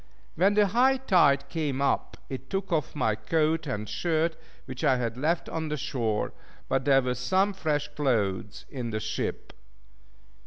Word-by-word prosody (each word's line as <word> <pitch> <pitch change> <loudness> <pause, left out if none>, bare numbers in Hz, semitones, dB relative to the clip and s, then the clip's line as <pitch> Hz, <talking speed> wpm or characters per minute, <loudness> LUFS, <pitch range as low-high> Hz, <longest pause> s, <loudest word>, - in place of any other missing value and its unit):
When 195 +5 +3
the 210 -1 +5
high 250 +7 +3
tide 155 - +3
came 150 -5 -2
up 140 -1 0
it 130 0 -7
took 195 0 -3
off 155 -3 -1
my 120 -7 +1
coat 160 +6 0
and 105 -4 -3
shirt, 165 +2 0 0.3
which 130 -1 -7
I 130 - +4
had 115 -2 -2
left 155 +7 0
on 160 -1 -3
the 150 - -2
shore; 115 -6 -1 0.3
but 135 -1 0
there 135 -2 +5
were 125 0 0
some 185 - +1
fresh 150 -6 -1
clothes 105 -8 -1
in 125 -4 -4
the 110 -1 -2
ship. 110 - -4
145 Hz, 165 wpm, -27 LUFS, 125-165 Hz, 0.3 s, the